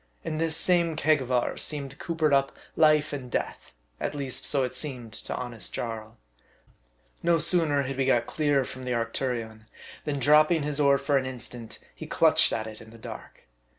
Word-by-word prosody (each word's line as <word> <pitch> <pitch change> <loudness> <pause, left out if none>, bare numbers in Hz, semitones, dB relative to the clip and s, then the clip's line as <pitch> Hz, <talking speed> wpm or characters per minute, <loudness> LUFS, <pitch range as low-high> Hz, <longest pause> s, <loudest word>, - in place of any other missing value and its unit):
In 155 - -3
this 160 -1 +1
same 170 -3 +3
keg 155 -1 +2
of 130 0 -6
ours 125 -1 0
seemed 140 -3 -3
coopered 160 -3 0
up 135 0 +3 0.2
life 155 -1 +4
and 130 -3 -5
death, - - -4 0.3
at - - -3
least 135 -3 -4
so 135 -3 +1
seemed 130 -3 -4
it - - -7
to - - -3
honest 120 -6 -5
Jarl. 110 -2 -5 1.0
No 170 0 +3
sooner 160 -3 +3
had 135 0 -4
we 135 - +1
got 120 -3 +2
clear 145 -2 +1
from 130 0 -8
the 125 -1 -2
Arctu 120 +3 -1
rion, 110 -2 -6 0.4
than 145 -2 -2
dropping 150 +4 +4
his 150 0 -2
oar 140 -1 +5
for 140 +1 +1
an 130 -1 -1
instant, 120 -3 -7 0.2
he - - -9
clutched - - +4
at 110 - -2
it 110 -1 -9
in 110 - -13
the 115 - -14
dark. 110 - -10
135 Hz, 190 wpm, -27 LUFS, 120-150 Hz, 1.0 s, oar